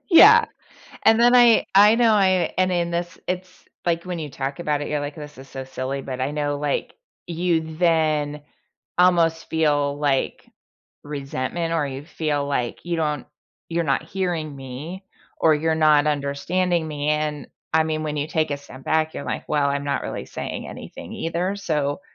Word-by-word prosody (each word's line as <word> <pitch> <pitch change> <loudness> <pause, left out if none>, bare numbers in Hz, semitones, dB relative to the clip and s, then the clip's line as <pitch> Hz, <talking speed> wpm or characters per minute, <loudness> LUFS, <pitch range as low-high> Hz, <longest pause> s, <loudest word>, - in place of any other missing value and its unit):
Yeah, 445 +6 +8 0.6
and 220 0 +6
then 240 +1 +5
I 240 -2 +6
I 205 +2 +8
know 230 -1 +4
I 190 -3 +3
and 185 0 +3
in 175 -1 0
this, 175 +1 -3
it's 180 0 -3 0.4
like, 170 -1 0
when 180 -2 -4
you 150 -2 -5
talk 135 +1 -4
about 150 -3 -1
it, - - -4
you're 150 -1 -1
like, 145 0 -5
“This 150 -3 -10
is 135 +1 -12
so 135 0 -7
silly,” 130 +1 -4
but 130 -1 -5
I 130 +2 0
know, 145 -1 -1
like, 145 -1 -2 0.3
you 165 -2 -1
then 155 -4 +1 0.6
almost 170 -2 +3
feel, 145 -3 +1
like, 145 -2 0 0.6
resentment 145 +3 -3
or 155 -3 +1
you 135 +1 -6
feel, 150 -4 -1
like, 125 -4 -2
you 175 -1 -2
don't 150 -3 -1 0.4
you're 170 0 -1
not 140 0 +1
hearing 165 -4 -3
me, 140 +9 -8 0.4
or 160 -1 +5
you're 160 +2 +1
not 155 -2 +4
understanding 160 +4 0
me, 145 -1 -3
and 150 -1 -2 0.3
I 160 - +5
mean, 155 0 -2
when 150 -1 -3
you 145 0 -1
take 155 -1 0
a 145 - -1
step 135 -2 -13
back, 160 0 +1
you're 140 - -5
like, - - -4
well, 145 -2 +2
I'm 140 0 -1
not 140 -1 -1
really - - -5
saying - - -5
anything - - -9
either, 175 +4 -2
so. 150 -5 -1
155 Hz, 180 wpm, -23 LUFS, 145-175 Hz, 0.6 s, Yeah